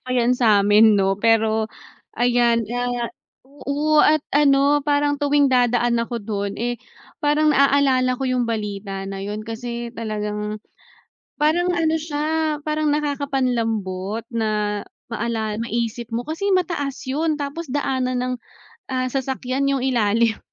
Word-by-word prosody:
pa - - -16
yan 240 0 +3
samin 215 -2 +5
no 195 0 +1
pero 220 -1 +2 0.5
ayan, 240 -1 +3
ah. 245 -1 -1 0.6
Oo 300 +2 +3
at 310 -1 +4
ano 285 0 +4
parang 290 0 +2
tuwing 285 -1 +3
dadaan 240 -1 +2
ako 235 +1 -3
dun, 200 -1 -3
eh, 240 +1 -3 0.4
parang 300 0 +3
na-aalala 270 -2 +3
ko 270 - -3
yung 250 -2 0
balita 200 -3 -4
na 195 0 -6
yun 205 +2 -4
kasi 235 +1 -5
talagang, 210 -2 -4 0.8
parang 320 +4 +2
ano 320 -2 +1
siya 310 0 -1
parang 305 0 0
nakaka-panlambot 235 -9 -1
na 210 -2 -1 0.3
maala 220 -1 -2
maisip 235 0 -3
mo 235 +1 -3
kasi 325 +6 -2
mataas 305 -8 -2
yun 305 +4 0
tapos 290 +2 -5
daanan 260 -2 -1
ng, 250 0 -1 0.6
ah, 255 0 0
sasakyan 265 0 -2
yung 275 -2 0
ilalim. 230 -3 +2
245 Hz, 130 wpm, -22 LUFS, 220-285 Hz, 0.8 s, samin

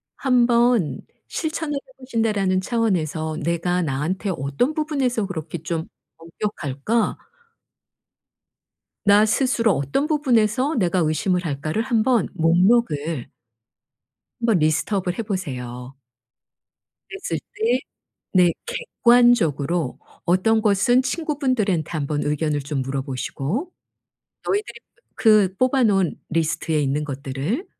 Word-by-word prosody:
'한번 240 - +2 0.3
실천을 315 -2 -3
해 - - -1 0.2
보신다.'라는 215 -7 0
차원에서 165 -9 -1
'내가 170 +2 0
나한테 165 +7 -2
어떤 165 - -1
부분에서 275 -8 0
그렇게 165 -3 -5
좀 165 -1 -3 0.3
엄격할까?' 170 - -2 1.9
'나 205 +1 +6
스스로 230 0 +2
어떤 140 - -1
부분에서 260 -2 +2
내가 185 -5 +1
의심을 175 +3 0
할까?'를 155 +6 -2
한번 235 -2 +2
목록을 165 - +2 1.1
한번 230 -6 +2
리스트 155 +6 +1
업을 185 -2 -1
해 230 - -2
보세요. 130 - -5 1.1
그랬을 390 0 -4 0.2
때 445 +3 +1 0.5
네, 180 -3 +5
객관적으로 235 - +2 0.3
어떤 190 +6 +3
것은 215 +4 +3
친구분들한테 255 - -1
한번 150 -2 -2
의견을 150 0 0
좀 140 0 -3
물어 135 +1 -2
보시고 140 - -3 0.8
너희들이 410 +1 -2 0.4
그 210 -4 +4
뽑아 255 +2 +2
놓은 195 -6 +2
리스트에 160 -1 0
있는 145 +2 0
것들을 140 - -3
190 Hz, 255 characters per minute, -22 LUFS, 155-240 Hz, 1.9 s, 나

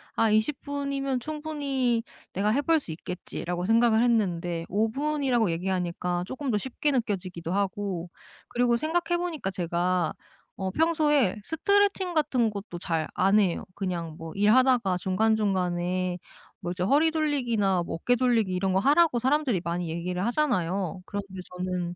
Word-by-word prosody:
'아 225 - +3
20 215 +6 +1
분이면 280 -2 -2
충분히 280 -5 -1 0.3
내가 200 +3 +1
해 275 +6 +2
볼 325 +2 +3
수 225 - -8
있겠지.'라고 175 +1 -5
생각을 225 +1 +4
했는데 175 -8 0
5 215 +3 0
분이라고 270 - +1
얘기하니까 180 0 -2
조금 260 +2 -3
더 210 - +2
쉽게 265 +6 -1
느껴지기도 185 - -2
하고, 195 -3 -2 0.4
그리고 240 0 +2
생각해 345 +5 0
보니까 335 - -3
제가 175 -1 0 0.4
어 190 -1 -2
평소에 295 - +2
스트레칭 385 - +1
같은 255 -8 +2
것도 200 -3 -7
잘 165 -3 -1
안 195 +3 +4
해요. 185 -5 +1
그냥 175 -5 -4
뭐 165 0 -8
일하다가 215 -2 +4
중간중간에 185 -3 0 0.4
뭐 175 - -3
이제 180 - -3
허리 290 - +4
돌리기나 240 - +1
뭐 - - -4
어깨 245 +9 +1
돌리기 230 -6 +2
이런 185 +1 0
거 190 - +3
하라고 285 - +4
사람들이 260 - +1
많이 170 0 -2
얘기를 180 +3 -2
하잖아요. 195 - 0
그런데 205 -1 -5 0.3
저는 180 -1 -3
210 Hz, 335 characters per minute, -27 LUFS, 180-275 Hz, 0.4 s, 생각을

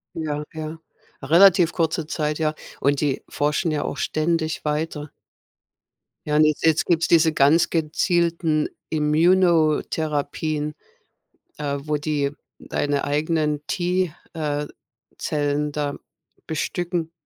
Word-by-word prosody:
Ja, 150 -2 -3
ja, 155 0 -6 0.4
relativ 170 +4 +5
kurze 165 -1 -1
Zeit, 150 -1 -2
ja. 155 -1 0 0.3
Und 140 0 +2
die 145 -3 0
forschen 150 +4 0
ja 150 -1 -1
auch - - -3
ständig 160 0 -1
weiter. 150 0 -2 1.2
Ja, 150 0 +1
un 155 - +6
und 155 0 +4
jetzt 160 -1 +3
gibt 170 -2 +2
es - - 0
diese 165 -1 +5
ganz 155 +4 +4
gezielten 165 -1 +1 0.2
Imuno-Therapien. 155 -2 +1 0.8
Äh, 140 -1 -2
wo 150 +1 -1
die 145 -1 -1 0.3
deine 145 -1 -1
eigenen 150 0 0
„T“, 180 -2 0 0.2
äh, 150 -2 -2 0.5
Zellen 145 0 -1
da 145 -1 -2 0.5
bestücken. 170 +1 -2
155 Hz, 115 wpm, -23 LUFS, 150-165 Hz, 1.2 s, un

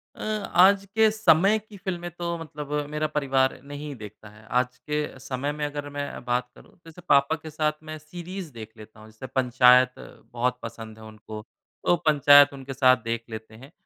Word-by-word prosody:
अ, - - -11 0.3
आज 195 +2 +6
के 220 -1 +5
समय 210 -1 +4
की 215 -1 -15
फ़िल्में 175 -3 -5
तो 170 0 -4
मतलब 150 -3 -8 0.2
मेरा 150 +1 -1
परिवार 135 -4 0
नहीं 145 0 -7
देखता 105 -1 -12
है। 105 +1 -18
आज 125 0 0
के 150 -3 -4
समय 135 +2 -3
में 150 0 -3
अगर 145 0 -5
मैं 145 -3 -6
बात 125 0 -1
करूँ - - -18
तो 165 -1 -17
जैसे 165 +2 -14
पापा 140 +2 +4
के 160 0 -10
साथ 155 0 0
मैं 155 0 -7
सीरीज़ 175 +2 -8
देख 110 -1 -9
लेता 110 0 -14
हूँ 110 - -14
जैसे 110 +4 -10
पंचायत 125 0 +4 0.4
बहुत 125 +1 -1
पसंद 115 -1 -8
है - - -12
उनको। 110 0 -10 0.4
तो 175 - +4
पंचायत 145 -1 +6
उनके 135 0 -8
साथ 130 -1 +5
देख 115 0 -3
लेते 110 0 -9
हैं। 135 +7 -14
140 Hz, 190 wpm, -25 LUFS, 125-155 Hz, 0.4 s, आज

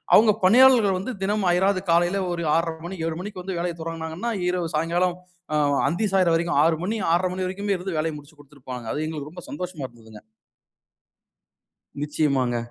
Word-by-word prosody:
அவுங்க 215 0 +7
பணியாளர்கள் 225 -2 +6
வந்து 195 +7 -4
தினமும் 195 -1 +1
அயராது 190 +2 +2
காலையில 175 +3 +3
ஒரு 170 -1 -3
6:30 165 0 0
மணி, 185 +2 -6
7:00 165 -1 -2
மணிக்கு 200 -1 -7
வந்து 185 -1 -4
வேலைய 170 0 -2
தொடங்குனாங்கன்னா, 165 +5 -4 0.2
இரவு 180 -2 -1
சாயங்காலம், 175 +3 +1 0.4
ஆ - - +2 0.3
அந்தி 175 +9 0
சாயிற 185 -3 +4
வரைக்கும் 170 -2 +1
6:00 160 0 +3
மணி, 215 +5 -1
6:30 180 +2 +2
மணி 185 0 -2
வரைக்குமே 200 +2 -1
இருந்து 180 -3 -4
வேலைய 160 +1 -1
முடிச்சுக் 145 +1 -15
குடுதுட்டு 140 -2 -21
போனாங்க. 125 -2 -6
அது 155 - -2
எங்களுக்கு 150 -2 -6
ரொம்ப 180 0 -10
சந்தோஷமா 170 -2 -5
இருந்ததுங்க. 110 -3 -15 1.8
நிச்சயமாங்க. 140 -5 0
175 Hz, 170 wpm, -24 LUFS, 155-190 Hz, 1.8 s, அவுங்க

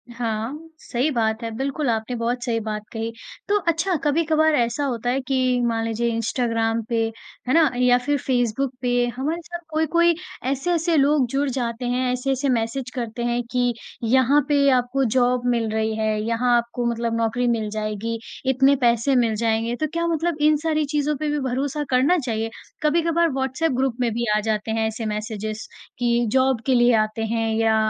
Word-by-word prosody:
हाँ, 240 +7 -4
सही 255 +2 -1
बात 220 -2 0
है। 230 - -2
बिल्कुल 275 +2 -2
आपने 225 +2 -1
बहुत 240 +1 -2
सही 235 -3 0
बात 210 -1 -4
कही। 225 0 -3 0.4
तो 415 - +4
अच्छा, 335 +3 +1
कभी-कभार 315 +1 +2
ऐसा 235 +3 0
होता 245 -3 -2
है 265 +2 0
कि 255 -1 +1
मान 225 -1 0
लीजिए 230 +1 -1
इंस्टाग्राम 230 0 0
पे, 235 - 0 0.5
है 255 - +1
ना? 320 -3 +5
या 250 0 +4
फिर 290 0 +2
फ़ेसबुक 250 0 0
पे 245 - 0 0.2
हमारे 305 +7 -2
साथ 345 +1 -7
कोई-कोई 330 +2 +2 0.4
ऐसे-ऐसे 335 +4 0
लोग 285 -1 +4
जुड़ 280 +1 +1
जाते 245 -1 -3
हैं, 250 +1 0
ऐसे-ऐसे 270 +2 -1
मैसेज 240 +2 -1
करते 235 -1 -4
हैं 240 0 0
कि 245 -1 +1 0.3
यहाँ 260 +5 +4
पे 280 -1 +4
आपको 255 +2 +1
जॉब 245 0 +2
मिल 225 -1 -1
रही 220 0 0
है, 215 -1 0
यहाँ 240 +2 +2
आपको 235 +1 -2
मतलब 230 0 -2
नौकरी 230 +2 0
मिल 225 -3 0
जाएगी, 215 +1 -3 0.3
इतने 270 +2 +4
पैसे 235 +3 +3
मिल 230 -3 +2
जाएँगे। 225 +1 +1
तो 310 +5 -1
क्या 335 0 0
मतलब 330 -1 0
इन 305 0 +5
सारी 310 -2 +1
चीज़ों 295 0 +1
पे 305 +1 -2
भी 295 - 0
भरोसा 280 +3 -2
करना 270 +8 +3
चाहिए? 225 -5 -2 0.3
कभी-कभार 335 +2 +2
व्हाट्सएप 265 +4 -1
ग्रुप 260 -2 +1
में 235 -2 +1
भी 235 +1 -1
आ - - +2
जाते 215 0 -2
हैं 220 0 +1
ऐसे 220 +1 -4
मैसेजेज़ 215 0 -4 0.3
कि 240 0 +2
जॉब 260 -2 +2
के 265 - +2
लिए 240 0 +5
आते 215 +1 -5
हैं 225 -1 0
या 225 0 +3
245 Hz, 185 wpm, -23 LUFS, 230-280 Hz, 0.5 s, ना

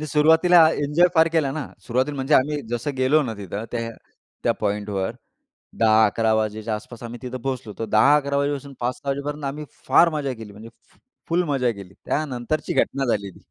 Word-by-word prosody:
मी 155 - -4
सुरुवातीला 160 +4 +5
आ - - +6 0.2
एन्जॉय 150 +5 +4
फार 160 0 +5
केला 155 -5 +2
ना, 150 0 -4 0.2
सुरुवातीला 130 +4 0
म्हणजे 135 +2 +1
आम्ही 145 +3 +2
जसं 120 +4 -2
गेलो 130 +4 +3
ना 120 -5 -4
तिथं 100 +2 -6
त्या 115 -1 -3 0.5
त्या - - +3
पॉइंटवर 100 -1 -2 0.7
10-11 110 0 +3
वाजेच्या 110 0 -1
आसपास 110 +2 -9
आम्ही 120 0 -7
तिथं 130 0 -5
पोहोचलो 130 -4 -4
होतो. 115 - -5
10-11 140 +6 +3
वाजेपासून 140 0 -2
5-6 125 +3 -3
वाजेपर्यंत 145 +2 -4
आम्ही 145 +2 -4 0.2
फार 170 - +6
मज्जा 145 -3 -2
केली, 110 -4 -10
म्हणजे 110 +3 -11 0.2
फ - - -29 0.3
फुल 170 +2 +2
मजा 130 -4 +1
केली. 100 -4 -10
त्यानंतरची 145 0 -2
घटना 135 0 -1
झाली 100 -3 -1
ती. - - -18
130 Hz, 180 wpm, -23 LUFS, 110-145 Hz, 0.7 s, आ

